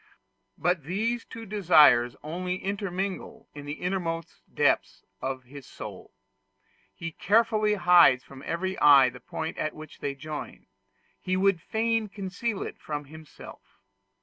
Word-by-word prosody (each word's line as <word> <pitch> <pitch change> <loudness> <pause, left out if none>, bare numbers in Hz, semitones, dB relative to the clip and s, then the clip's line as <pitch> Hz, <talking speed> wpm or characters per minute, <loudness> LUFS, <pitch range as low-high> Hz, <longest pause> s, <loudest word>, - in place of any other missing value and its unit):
But 175 -5 0
these 225 +7 -1
two 225 0 -9
desires 160 - +5
only 180 +4 -3
intermingle 195 +3 -4
in 145 0 -9
the 145 - -3
innermost 170 -1 -3
depths - - +1 0.2
of 130 0 -3
his 135 +1 -12
soul: - - -9 0.9
he 165 0 -5
carefully 215 +4 +2
hides 175 -9 +6
from 135 -1 -13
every 185 +3 -2
eye 140 -3 +7
the 125 +1 -12
point 160 +6 -5
at 155 - -2
which 155 0 -11
they 140 -1 -3
join; 150 +2 -7 0.6
he 185 0 -1
would 195 -2 +2
fain 225 +1 0
conceal 195 +2 -4
it - - -8
from 150 -1 -5
himself. 155 +1 -12
175 Hz, 135 wpm, -27 LUFS, 150-200 Hz, 0.9 s, eye